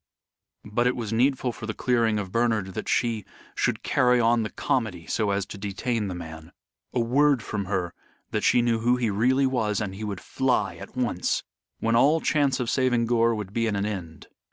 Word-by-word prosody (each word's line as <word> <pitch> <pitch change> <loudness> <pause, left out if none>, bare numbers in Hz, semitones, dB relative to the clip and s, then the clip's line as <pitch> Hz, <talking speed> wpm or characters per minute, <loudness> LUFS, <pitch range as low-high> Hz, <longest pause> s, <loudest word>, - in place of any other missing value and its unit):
But 120 +4 +1
it 125 - +1
was 115 -3 -4
needful 130 +1 +2
for 110 - -8
the 110 - -3
clearing 115 -3 +1
of 100 -3 -4
Bernard 110 -5 0
that - - -5
she 115 -3 +1 0.3
should - - -1
carry 125 -1 +3
on 115 0 +3
the 110 - -2
comedy 105 -10 -2
so 110 -2 0
as 100 -1 0
to 100 - -9
detain 105 +2 -2
the 90 - -4
man. 80 -1 -9 0.4
A - - -1
word 135 +1 +3
from 105 -2 -3
her, 95 -3 -2 0.4
that - - -1
she 120 - +4
knew 115 -1 +1
who 120 +2 +3
he 120 -4 0
really 130 +7 +2
was, 110 -6 0
and 105 -4 -3
he 100 +3 -7
would 100 -3 -4
fly 130 -1 0
at - - -11
once 120 -8 0 0.4
when 115 +1 +2
all 145 +7 +5
chance 140 -4 +1
of 125 - -1
saving 125 -2 +2
Gore 115 0 +2
would 105 -2 -6
be 115 0 +1
at 105 - 0
an 100 0 -1
end. 90 -7 -6
115 Hz, 205 wpm, -26 LUFS, 100-125 Hz, 0.4 s, all